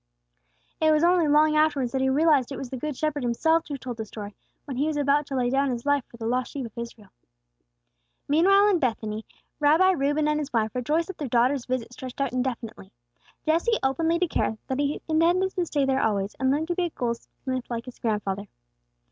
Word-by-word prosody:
It 315 Hz, -, +4 dB
was 305 Hz, +1 st, +3 dB
only 345 Hz, -2 st, +4 dB
long 305 Hz, +1 st, +4 dB
afterwards 295 Hz, -5 st, +2 dB
that 265 Hz, -, -1 dB
he 265 Hz, -, +2 dB
realized 290 Hz, -2 st, +3 dB
it 275 Hz, -, -4 dB
was 255 Hz, -1 st, -7 dB
the -, -, -3 dB
Good 280 Hz, +1 st, -4 dB
Shepherd 305 Hz, -2 st, -1 dB
Himself 320 Hz, +8 st, +1 dB
who 285 Hz, -2 st, -4 dB
told 245 Hz, -2 st, -7 dB
the 220 Hz, -, -4 dB
story, 205 Hz, -1 st, -8 dB, 0.3 s
when 270 Hz, -4 st, -5 dB
He 290 Hz, +3 st, +1 dB
was 310 Hz, -1 st, -1 dB
about 285 Hz, 0 st, +2 dB
to 275 Hz, -, -4 dB
lay 245 Hz, -1 st, +1 dB
down 275 Hz, +1 st, +2 dB
His 240 Hz, -1 st, -4 dB
own 285 Hz, -, +3 dB
life 285 Hz, -2 st, 0 dB
for 235 Hz, -, -15 dB
the 225 Hz, -, -6 dB
lost 250 Hz, +2 st, -1 dB
sheep 275 Hz, -3 st, -4 dB
of 225 Hz, -, -11 dB
Israel. 230 Hz, -4 st, -8 dB, 1.2 s
Meanwhile 390 Hz, +7 st, +5 dB
in 375 Hz, -4 st, +3 dB
Bethany, 220 Hz, -5 st, -2 dB, 0.3 s
Rabbi 315 Hz, +6 st, +5 dB
Reuben 290 Hz, -2 st, +1 dB
and 300 Hz, 0 st, +1 dB
his 295 Hz, -1 st, -4 dB
wife 220 Hz, -2 st, 0 dB
rejoiced 300 Hz, +7 st, 0 dB
that 385 Hz, -, -8 dB
their 290 Hz, -, -3 dB
daughter's 250 Hz, +2 st, +2 dB
visit 250 Hz, -2 st, -3 dB
stretched 255 Hz, +1 st, -8 dB
out 275 Hz, -3 st, -1 dB
indefinitely. 235 Hz, -6 st, -4 dB, 0.5 s
Jesse 340 Hz, +9 st, +2 dB
openly 325 Hz, +5 st, +1 dB
declared 335 Hz, -10 st, 0 dB
that 265 Hz, +1 st, -3 dB
he 290 Hz, +1 st, -1 dB
intended 345 Hz, +4 st, +2 dB
to 360 Hz, -3 st, -2 dB
stay 285 Hz, -3 st, +1 dB
there 270 Hz, 0 st, +1 dB
always, 200 Hz, -2 st, 0 dB
and 260 Hz, 0 st, +2 dB
learn 295 Hz, +4 st, +1 dB
to 350 Hz, -, -1 dB
be 360 Hz, -, +1 dB
a -, -, -2 dB
goldsmith 255 Hz, 0 st, -4 dB
like 235 Hz, -1 st, -4 dB
his 250 Hz, -, -11 dB
grandfather. 205 Hz, -3 st, -2 dB
275 Hz, 215 wpm, -26 LUFS, 240-310 Hz, 1.2 s, Meanwhile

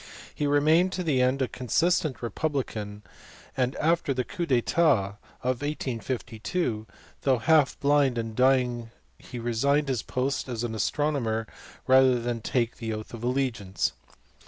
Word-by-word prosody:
He 145 Hz, -, -1 dB
remained 155 Hz, +6 st, +4 dB
to 185 Hz, -, -2 dB
the 145 Hz, -6 st, +2 dB
end 130 Hz, +2 st, +2 dB
a -, -, 0 dB
consistent 130 Hz, +1 st, 0 dB
republican, 115 Hz, -5 st, -3 dB, 0.5 s
and 130 Hz, 0 st, 0 dB
after 160 Hz, -3 st, +1 dB
the 125 Hz, -, 0 dB
coup 175 Hz, +4 st, -4 dB
d 130 Hz, -, +3 dB
etat 115 Hz, -9 st, +2 dB, 0.3 s
of 130 Hz, 0 st, -1 dB
1852 125 Hz, -2 st, -3 dB, 0.3 s
though 135 Hz, -2 st, +3 dB
half 145 Hz, +4 st, +3 dB
blind 140 Hz, -3 st, +3 dB
and 115 Hz, -1 st, -3 dB
dying 125 Hz, -2 st, +2 dB, 0.3 s
he 125 Hz, -, -9 dB
resigned 135 Hz, +5 st, +1 dB
his 125 Hz, -4 st, 0 dB
post 130 Hz, +1 st, -2 dB
as 120 Hz, -2 st, -3 dB
astronomer 115 Hz, 0 st, -1 dB, 0.4 s
rather 130 Hz, -1 st, +5 dB
than 120 Hz, -1 st, -3 dB
take 120 Hz, +1 st, -1 dB
the 115 Hz, -1 st, -4 dB
oath 110 Hz, +2 st, -7 dB
of 115 Hz, -1 st, -7 dB
allegiance. 125 Hz, -7 st, -1 dB
130 Hz, 140 wpm, -27 LUFS, 115-145 Hz, 0.5 s, rather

